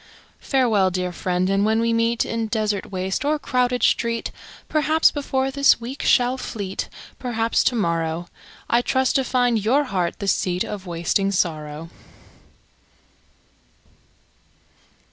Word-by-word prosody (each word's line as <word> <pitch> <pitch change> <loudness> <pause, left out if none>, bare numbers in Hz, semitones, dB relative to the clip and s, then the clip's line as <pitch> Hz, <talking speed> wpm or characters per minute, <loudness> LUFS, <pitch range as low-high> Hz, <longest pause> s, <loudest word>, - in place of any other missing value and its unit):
Farewell, 225 -8 +2
dear 180 0 -2
friend, 180 +1 -1
and 195 +1 +2
when 220 +1 +2
we 230 0 +1
meet, 230 0 +1
In 230 -1 -2
desert 215 -3 -2
waste 190 +4 -2
or 300 +2 +1
crowded 250 -3 0
street, 230 -1 +1 0.4
Perhaps 310 +1 +3
before 270 -2 -1
this 280 -2 +4
week 245 +4 -6
shall 250 +1 +3
fleet, 200 -6 -5 0.3
Perhaps 230 -2 0
to 250 - +2
morrow. 170 -4 -1 0.4
I 235 - +3
trust 260 +1 +1
to 270 - +1
find 245 -4 +1
your 265 +7 +3
heart 185 -10 -2
the 200 - -5
seat 180 -2 +1
Of 200 -2 -7
wasting 175 +3 0
sorrow. 155 -3 -2
225 Hz, 130 wpm, -22 LUFS, 185-250 Hz, 0.4 s, this